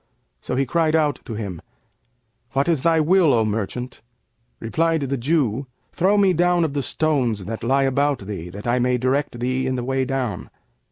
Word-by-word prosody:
So - - -3
he 135 +1 +1
cried 160 +3 +1
out 150 -4 +1
to 115 - -6
him, 100 -6 -5 0.9
'What 135 +3 +1
is 165 -6 +1
thy 165 +1 +3
will, 160 -2 +4
O 110 -1 +2
merchant?' 115 +4 -4 0.6
Replied 160 +7 0
the 140 0 -1
Jew, 135 -2 0 0.3
'Throw 195 +4 +2
me 195 -2 +4
down 175 0 +2
of 155 -4 -1
the 145 - -1
stones 125 - 0
that 110 +2 -5
lie 135 +3 +2
about 140 +1 +1
thee, 95 -4 -6
that 100 +4 -9
I 120 +1 +1
may 125 0 +2
direct 130 0 -1
thee 130 +2 -1
in 130 - -1
the 125 - -3
way 135 +1 0
down.' 130 -8 -3
135 Hz, 185 wpm, -22 LUFS, 120-155 Hz, 0.9 s, will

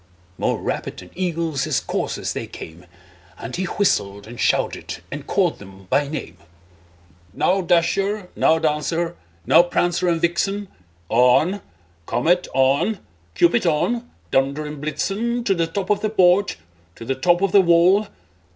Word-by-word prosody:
More - - 0
rapid - - -4
than 90 - -11
eagles 165 -5 -2
his - - +1
coursers - - -3
they - - -5
came, 85 +2 -11 0.5
And 115 - -6
he 185 - -2
whistled, 100 - 0
and 120 +2 -11
shouted, - - 0
and - - -7
called - - +1
them 95 -1 -13
by 140 +2 +2
name; 140 - -6 1.0
"Now, 190 +2 +1
Dasher! 185 +3 +1
now, 160 - +3
Dancer! 160 +2 -1 0.3
now, - - +7
Prancer 175 0 0
and 165 -1 +1
Vixen! 195 +4 -1 0.4
On! 125 - +3 0.5
Comet, 170 +10 +1
on! 135 +11 +2 0.4
Cupid, 175 - +3
on! 235 +10 0 0.2
Dunder 140 +3 +1
and 150 -1 -7
Blitzen 210 +10 -2
To 200 - +2
the 165 -3 0
top 190 +4 -3
of 205 - +2
the 215 - 0
porch, 190 -1 +3 0.4
to 115 - -10
the 135 - 0
top 175 +7 +2
of 195 - +2
the 200 0 +7
wall! 180 +4 +4
170 Hz, 150 wpm, -21 LUFS, 140-195 Hz, 1.0 s, now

